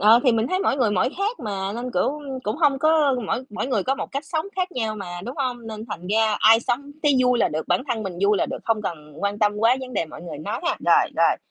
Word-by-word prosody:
Ờ, 220 Hz, +4 st, +7 dB
thì 250 Hz, -, +5 dB
mình 225 Hz, 0 st, +1 dB
thấy 370 Hz, -, 0 dB
mỗi 280 Hz, -, +1 dB
người 235 Hz, -6 st, +2 dB
mỗi 185 Hz, +2 st, +2 dB
khác 415 Hz, +5 st, -1 dB
mà, 195 Hz, -2 st, -3 dB
nên, 245 Hz, +2 st, -4 dB
kiểu, 295 Hz, +2 st, 0 dB, 0.2 s
cũng 210 Hz, +5 st, -1 dB
hông 290 Hz, -4 st, +3 dB
có 310 Hz, -3 st, +3 dB
mỗi 255 Hz, -, -2 dB
mỗi 215 Hz, -, -3 dB
người 240 Hz, -7 st, 0 dB
có 265 Hz, -, 0 dB
một -, -, -6 dB
cách 275 Hz, +3 st, -3 dB
sống 320 Hz, +2 st, -2 dB
khác 370 Hz, -1 st, -1 dB
nhau 220 Hz, -3 st, -2 dB
mà, 175 Hz, -3 st, -6 dB
đúng 250 Hz, -, -6 dB
hông? 245 Hz, -4 st, -3 dB
Nên 220 Hz, 0 st, -7 dB
thành 175 Hz, +2 st, -6 dB
ra 215 Hz, 0 st, +2 dB
ai 225 Hz, +1 st, +7 dB
sống 280 Hz, +5 st, -2 dB
thấy 290 Hz, -, +5 dB
vui 250 Hz, -1 st, +3 dB
là -, -, +3 dB
được, 155 Hz, +1 st, -4 dB
bản 180 Hz, +4 st, +2 dB
thân 230 Hz, -3 st, -1 dB
mình 185 Hz, -4 st, -5 dB
vui 205 Hz, +1 st, +4 dB
là -, -, +1 dB
được, -, -, -5 dB
không 225 Hz, -2 st, 0 dB
cần 150 Hz, -5 st, -6 dB
quan 200 Hz, 0 st, -1 dB
tâm 210 Hz, -1 st, +3 dB
quá 230 Hz, +4 st, +4 dB
vấn 255 Hz, -1 st, -7 dB
đề 165 Hz, -, 0 dB
mọi 155 Hz, -, -11 dB
người 170 Hz, -4 st, -7 dB
nói 205 Hz, +10 st, -4 dB
ha. 350 Hz, -, +1 dB
Rồi, -, -, +4 dB
rồi. -, -, +4 dB
225 Hz, 280 wpm, -23 LUFS, 205-270 Hz, 0.2 s, Ờ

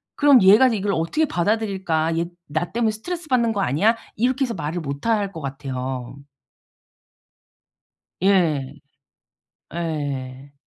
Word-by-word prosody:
그럼 285 Hz, -4 st, +6 dB
'얘가 210 Hz, +7 st, +7 dB
이걸 205 Hz, -3 st, -1 dB
어떻게 165 Hz, -, 0 dB
받아들일까? 190 Hz, -, 0 dB
얘 170 Hz, -, 0 dB, 0.2 s
나 155 Hz, +4 st, -2 dB
때문에 230 Hz, -1 st, +1 dB
스트레스받는 255 Hz, -1 st, -1 dB
거 205 Hz, -3 st, -1 dB
아니야?' 205 Hz, -, +2 dB, 0.2 s
이렇게 255 Hz, +4 st, +1 dB
해서 235 Hz, -, -4 dB
말을 165 Hz, -1 st, -4 dB
못 140 Hz, +2 st, -6 dB
할 205 Hz, -3 st, +1 dB
것 160 Hz, -, -7 dB
같아요. 130 Hz, -2 st, -5 dB, 2.1 s
예. 155 Hz, -8 st, +2 dB, 1.0 s
예. 140 Hz, -5 st, -4 dB
175 Hz, 250 characters per minute, -22 LUFS, 145-225 Hz, 2.1 s, 얘가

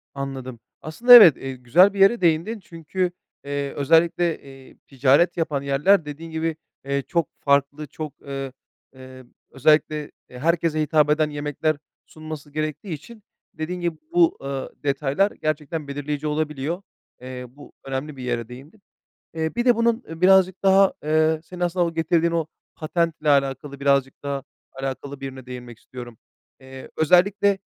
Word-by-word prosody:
Anladım. 130 Hz, -3 st, -6 dB, 0.2 s
Aslında 230 Hz, +11 st, +4 dB
evet, 205 Hz, -, +10 dB
eee, 135 Hz, 0 st, -6 dB
güzel 170 Hz, +11 st, +4 dB
bir 200 Hz, -, -6 dB
yere 195 Hz, +3 st, +5 dB
değindin 170 Hz, +7 st, +1 dB
çünkü, 175 Hz, +1 st, -3 dB, 0.3 s
eee, 140 Hz, 0 st, -3 dB
özellikle, 165 Hz, +3 st, +2 dB
eee, 135 Hz, -1 st, -15 dB
ticaret 140 Hz, +6 st, +3 dB
yapan 150 Hz, -4 st, -1 dB
yerler, 150 Hz, +6 st, +2 dB
dediğin 160 Hz, +3 st, -8 dB
gibi, 160 Hz, 0 st, -2 dB, 0.3 s
eee, 140 Hz, 0 st, -1 dB
çok 170 Hz, -4 st, 0 dB
farklı, 140 Hz, +1 st, +1 dB
çok, 150 Hz, 0 st, -8 dB
ııı, 135 Hz, -1 st, -6 dB, 0.4 s
eee, 130 Hz, 0 st, -13 dB, 0.3 s
özellikle, 150 Hz, +1 st, +1 dB, 0.2 s
eee, 125 Hz, -, -11 dB
herkese 165 Hz, +1 st, +1 dB
hitap 150 Hz, -1 st, +2 dB
eden 155 Hz, 0 st, +2 dB
yemekler 145 Hz, +1 st, -2 dB, 0.3 s
sunması 155 Hz, -2 st, -9 dB
gerektiği 155 Hz, +4 st, -4 dB
için, 210 Hz, +9 st, -11 dB, 0.3 s
dediğin 175 Hz, +2 st, -5 dB
gibi 170 Hz, -2 st, -2 dB
bu, 345 Hz, -1 st, +3 dB
ııı, 135 Hz, -1 st, -4 dB
detaylar 145 Hz, +7 st, +1 dB
gerçekten 155 Hz, 0 st, -4 dB
belirleyici 145 Hz, +1 st, -4 dB
olabiliyor. 150 Hz, +3 st, -2 dB, 0.4 s
Eee, 125 Hz, 0 st, -7 dB
bu 145 Hz, +3 st, -16 dB
önemli 135 Hz, +2 st, -5 dB
bir 125 Hz, -, -8 dB
yere 120 Hz, -2 st, -2 dB
değindin. 145 Hz, -, -13 dB, 0.5 s
Eee, 160 Hz, +4 st, -3 dB
bir 240 Hz, -, -1 dB
de 245 Hz, -2 st, +5 dB
bunun, 230 Hz, +1 st, +1 dB
eee, 165 Hz, +1 st, -9 dB
birazcık 190 Hz, 0 st, +4 dB
daha, 195 Hz, 0 st, +5 dB
eee, 155 Hz, +1 st, +2 dB
senin 180 Hz, +2 st, -11 dB
aslında 175 Hz, 0 st, +1 dB
o 165 Hz, -, -3 dB
getirdiğin 165 Hz, +1 st, +1 dB
o 165 Hz, -2 st, -1 dB, 0.3 s
patentle 160 Hz, -1 st, -1 dB
alakalı, 140 Hz, 0 st, 0 dB
birazcık 140 Hz, -1 st, +1 dB
daha 140 Hz, -2 st, -3 dB, 0.3 s
alakalı 135 Hz, +1 st, -6 dB
bir 135 Hz, -, -6 dB
yerine 130 Hz, -1 st, -8 dB
değinmek 125 Hz, -2 st, -9 dB
istiyorum. 120 Hz, -3 st, -10 dB, 0.4 s
Eee, 130 Hz, 0 st, -11 dB
özellikle, 190 Hz, +4 st, +3 dB
155 Hz, 150 wpm, -23 LUFS, 140-170 Hz, 0.5 s, evet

